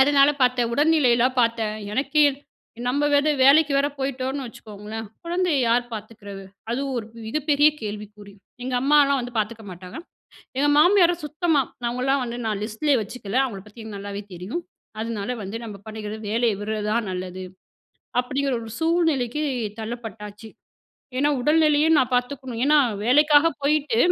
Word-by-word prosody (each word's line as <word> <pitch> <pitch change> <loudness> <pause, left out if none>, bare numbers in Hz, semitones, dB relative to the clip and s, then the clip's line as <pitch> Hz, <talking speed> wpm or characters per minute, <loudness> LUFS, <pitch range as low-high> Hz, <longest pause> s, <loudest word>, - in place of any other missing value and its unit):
அதனால 280 +1 +6
பார்த்தேன் 250 -2 +2
உடல்நிலையலாம் 260 -4 +3
பார்த்தேன். 230 -2 0 0.2
எனக்கே 290 +5 +2 0.6
நம்ம 280 +4 0
வேற 285 +1 +3 0.2
வேலைக்கு 290 +2 +6
வேற 280 - +2
போயிட்டோனு 265 0 -3
வச்சுக்கோங்களேன், 215 0 -8 0.2
குழந்தையை 345 -4 +1
யார் 240 +1 +3
பார்த்துக்கறது? 205 -2 -9 0.3
அதுவும் 270 +3 -2
ஒரு 220 - -6 0.2
மிகப்பெரிய 295 +4 +3
கேள்விக்குறி. 210 -1 -8 0.3
எங்க 255 0 -3
அம்மாலாம் 280 0 +4
வந்து 245 0 -7
பார்த்துக்க 220 +1 -3
மாட்டாங்க. 180 - -9 0.6
எங்க 285 +2 +3
மாமியாரும் 350 -1 +4
சுத்தமா 310 0 +1 0.3
அவங்களாம் 255 +3 0
வந்து, 235 0 -5
நான் 210 -2 -2
லிஸ்ட்லயே 255 +6 +1
வச்சுக்கல. 210 +1 -5
அவங்கள 215 -8 -4
பத்தி 210 +2 -13
எனக்கு 215 -2 -7
நல்லாவே 200 0 -6
தெரியும். 185 - -5 0.4
அதனால 225 -2 -4
வந்து 195 +4 -5
நம்ம 215 -3 -7
பண்ணிக்கிறது 215 0 -6
வேலைய 230 +1 +2
விடுறது 210 0 -3
தான் 230 -2 0
நல்லது. 185 0 -5 0.8
அப்டிங்கிற 265 +2 -1
ஒரு 225 - -8
சூழ்நிலைக்கு 320 -5 +1 0.4
தள்ளப்பட்டாச்சு. 220 -2 -7 0.7
ஏனா, 290 +2 +3
உடல்நிலையும் 305 +2 +4
நான் 255 -1 +2
பார்த்துக்கணும். 250 -1 -2
ஏனா, 300 +2 +5 0.3
வேலைக்காக 295 +5 +5
போயிட்டு 285 -4 +1
245 Hz, 135 wpm, -23 LUFS, 215-290 Hz, 0.8 s, அதனால